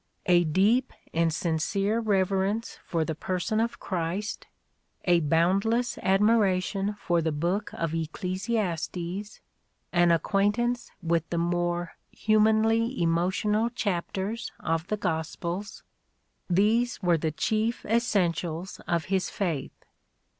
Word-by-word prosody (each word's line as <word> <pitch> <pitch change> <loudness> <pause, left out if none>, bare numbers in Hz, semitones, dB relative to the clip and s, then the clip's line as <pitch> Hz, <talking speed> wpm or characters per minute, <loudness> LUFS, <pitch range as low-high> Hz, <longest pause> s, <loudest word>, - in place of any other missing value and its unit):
A 175 -1 +5
deep 205 +11 +2 0.2
and 165 0 +2
sincere 190 +7 0
re 205 -4 +2
verence 195 +4 -2
for 165 -2 0
the 160 - -2
person 185 +6 -1
of 230 +1 -1
Christ, 185 +3 -3 0.3
— - - -31
a 175 -1 +5
boundless 190 +10 +1
admiration 195 0 +2
for 170 -1 +1
the 160 0 0
book 175 +8 -1
of 165 -1 -2
Ecclesiastes, 185 +2 -3 0.2
— 175 - -3
an 175 - +5
acquaintance 205 +8 +1
with 165 -1 0
the 170 - -2
more 175 0 0 0.2
humanly 220 +2 +2
emotional 190 +7 +1
chapters 200 0 -3
of 165 +2 -1
the 210 - -1
Gospels, 170 +3 -3 0.3
— - - -47 0.3
these 220 +7 +2
were 175 -2 +3
the 160 0 -1
chief 220 - -1
essentials 185 -6 0
of 170 -3 0
his 190 0 0
faith. 165 -9 -3
185 Hz, 120 wpm, -27 LUFS, 170-215 Hz, 0.3 s, A